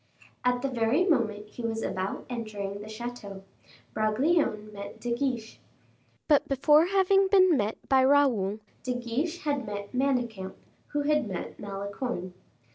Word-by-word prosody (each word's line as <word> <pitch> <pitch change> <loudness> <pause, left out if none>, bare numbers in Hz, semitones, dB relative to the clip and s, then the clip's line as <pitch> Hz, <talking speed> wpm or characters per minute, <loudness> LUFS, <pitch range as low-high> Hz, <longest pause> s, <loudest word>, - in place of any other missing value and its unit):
At 250 0 +1
the - - +2
very 255 +6 +2
moment 220 - +1
he 240 - -9
was 225 -1 -2
about 190 +1 -3
entering 205 -4 -5
the 215 - -9
chateau, 220 -4 -7 0.5
Bragelonne 215 -1 +1
met 200 0 -8
De 240 -1 -2
Guiche. 240 -3 -2 0.7
But 295 -3 +4
before 295 +4 +5
having 390 0 +4
been 375 -3 +6
met 215 -3 0
by 265 -1 +5
Raoul, 245 -8 +3 0.2
De 250 0 -2
Guiche 250 +9 -2
had 285 -3 0
met 205 0 -6
Manicamp, 245 -7 -1 0.3
who 295 - -1
had 300 -3 +2
met 185 -3 -6
Malicorne. 200 -1 -4
240 Hz, 140 wpm, -28 LUFS, 210-285 Hz, 0.7 s, been